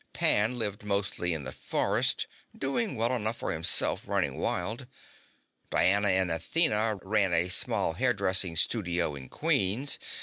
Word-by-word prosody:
Pan 110 +4 +3
lived 105 -3 -2
mostly 100 -3 -1
in 80 -3 -3
the 65 - -7
forests, - - -1 0.3
doing 175 +11 -2
well 115 +3 0
enough 115 -1 -1
for - - -4
himself 80 0 +2
running - - -1
wild. 120 +4 -2 0.8
Diana 100 +3 +2
and 95 -2 +2
Athena 110 - +1
ran 100 -2 +1
a 85 +2 +1
small 85 - 0
hairdressing 100 -5 +1
studio 85 -3 0
in 65 -2 -10
Queens. 105 +9 +1
100 Hz, 135 wpm, -28 LUFS, 90-115 Hz, 0.8 s, Pan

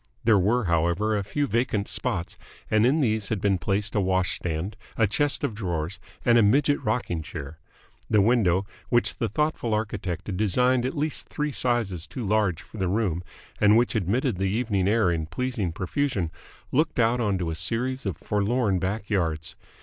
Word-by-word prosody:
There 110 -3 +5
were 110 +6 +2
however, 85 +5 +1
a 100 - 0
few 125 +9 -1
vacant 115 -4 0
spots, 100 -9 -2 0.4
and 110 +2 +4
in 150 +5 +3
these 110 -5 +1
had 110 - -1
been 100 -1 +1
placed 100 +4 -1
a 105 - +2
wash 95 -1 +1
stand, 85 +4 -3 0.2
a 115 - +4
chest 145 +7 0
of - - 0
drawers, 90 -4 -3 0.3
and 120 -1 +6
a - - +6
midget 140 +7 +3
rocking 105 -7 -1
chair. 80 0 -8 0.5
The 110 - +4
window, 100 -4 +3 0.2
which 120 -1 +2
the 115 - -1
thoughtful 120 -3 0
architect 100 -5 -3
had 95 -3 -4
designed 125 +5 +2
at 135 - -5
least 150 +1 -2
three 150 0 -2
sizes 115 - 0
too 125 - -5
large 100 -5 +1
for 110 - -13
the 95 - 0
room 90 -3 0 0.4
and 105 +1 +6
which 120 +1 +2
admitted 110 - 0
the 95 - +1
evening 100 -2 0
air 105 -3 +3
in 80 -2 -2
pleasing 110 0 -2
profusion, 95 - -1 0.4
looked 155 +3 +1
out 120 +1 +3
onto 95 -7 0
a - - -3
series 120 +9 -2
of 90 -5 -3
forlorn 105 0 0
back 100 +3 -2
yards. 80 -5 -1
105 Hz, 180 wpm, -26 LUFS, 90-120 Hz, 0.5 s, and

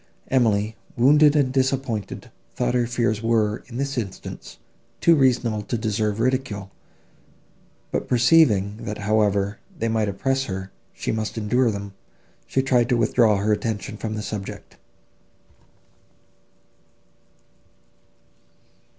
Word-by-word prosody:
Emily, 110 -4 +2 0.2
wounded 150 +4 +5
and 135 -3 +2
disappointed, 130 -5 -2 0.2
thought 125 0 0
her 120 -1 +1
fears 115 -3 0
were, 110 -2 +1
in 120 -1 -8
this 140 -1 -1
instance, 95 -5 -8 0.4
too 170 - +5
reasonable 125 -6 +2
to 120 +3 -3
deserve 110 -1 -1
ridicule; 115 -6 -1 1.2
but, - - -2
perceiving, 120 -6 +4
that, 105 - -4
however 105 -1 +1 0.2
they 115 - -1
might 110 -2 0
oppress 135 +7 -1
her, 95 -2 -5 0.2
she - - -4
must 110 0 -3
endure 120 +3 +2
them, 100 -2 -5 0.5
she 130 - 0
tried 125 -2 +2
to 125 - +3
withdraw 115 -2 +3
her 105 +2 +1
attention 105 -1 -3
from 110 0 -4
the 105 - -4
subject. 100 -2 -7
115 Hz, 115 wpm, -23 LUFS, 105-130 Hz, 1.2 s, wounded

